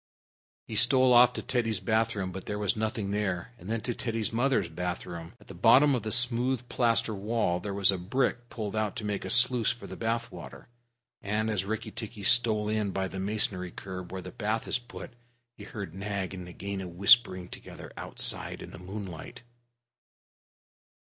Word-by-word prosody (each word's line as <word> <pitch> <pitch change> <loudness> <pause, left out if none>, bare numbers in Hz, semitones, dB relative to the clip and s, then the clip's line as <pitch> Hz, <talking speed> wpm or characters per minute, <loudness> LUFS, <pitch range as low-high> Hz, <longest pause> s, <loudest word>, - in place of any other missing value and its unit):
He 110 - -6
stole 125 +3 +5
off 120 0 +7
to - - -5
Teddy's 115 -5 0
bath 110 +3 0
room, 95 -2 -3
but 95 +1 -8
there 105 - -3
was 105 -2 0
nothing 110 -2 -2
there, 100 +1 -2
and 95 - -10
then 115 0 -1
to 120 - -2
Teddy's 115 -2 -3
mother's 120 -5 +1
bathroom. 85 0 -5
At - - -19
the - - -11
bottom 120 +10 +5
of 125 - 0
the 110 - -4
smooth 125 +1 +2
plaster 115 -2 +1
wall 100 -3 -1
there 100 +3 -5
was 100 0 +6
a 95 - -3
brick 120 +5 -1
pulled 105 -2 -5
out 110 0 -1
to 115 -4 -5
make 105 -1 -2
a - - -4
sluice 125 0 +4
for 120 - -9
the - - -8
bath 115 +1 -2
water, - - -11 0.5
and 110 +2 -1
as 95 -3 -1
Rikki 110 +2 -4
tikki 110 -2 -6
stole 110 -1 +5
in 105 -1 0
by 95 0 -2
the 95 +1 -7
masonry 95 -2 -2
curb 90 0 -8
where 95 -1 -6
the - - -8
bath 110 -1 -2
is - - +1
put, 120 - -10 0.4
he 100 - -11
heard 100 -6 -7
Nag 100 -1 -4
and 90 -1 -7
Nagaina 95 +2 -6
whispering 95 +1 +4
together - - -11
outside - - 0
in - - -10
the - - -10
moonlight. 95 +1 -8
105 Hz, 190 wpm, -28 LUFS, 95-115 Hz, 0.5 s, off